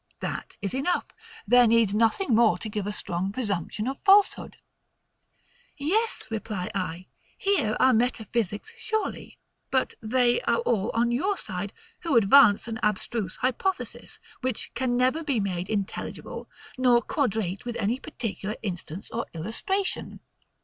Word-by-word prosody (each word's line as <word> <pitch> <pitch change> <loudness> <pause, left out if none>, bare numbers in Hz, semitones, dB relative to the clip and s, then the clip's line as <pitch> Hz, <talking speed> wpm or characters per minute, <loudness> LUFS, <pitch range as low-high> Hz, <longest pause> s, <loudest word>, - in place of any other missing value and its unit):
That - - -5
is 200 - -1
enough; 280 +7 0 0.4
there 245 +2 +6
needs 225 -3 +4
nothing 230 - +2
more 225 -1 +5
to 220 - -5
give 210 -2 -3
a - - -1
strong 190 -2 -2
presumption 210 -1 -2
of 270 +1 -3
falsehood. 400 0 +4 1.2
Yes, 420 +11 0
reply 210 -4 -3
I, 180 -2 -3 0.3
here 385 - +1
are 260 0 +5
metaphysics 230 - -1
surely; 445 -3 -3 0.3
but 260 -1 +1
they 240 - +2
are - - +1
all 225 - 0
on 235 +1 +2
your 370 +11 0
side, 190 0 -5 0.3
who 325 -8 +2
advance 220 0 +6
an 225 -1 -4
abstruse 210 -1 -1
hypothesis, 265 +10 -2 0.2
which 255 -3 -2
can 245 -1 0
never 260 +6 +2
be 275 -6 0
made 185 -2 -2
intelligible, 200 -3 -4 0.3
nor 245 -2 +4
quadrate 215 - -1
with 240 -1 -5
any 230 +4 0
particular 215 -4 -4
instance 180 -2 -6
or 230 +1 -3
illustration. 300 - -2
230 Hz, 135 wpm, -26 LUFS, 205-260 Hz, 1.2 s, there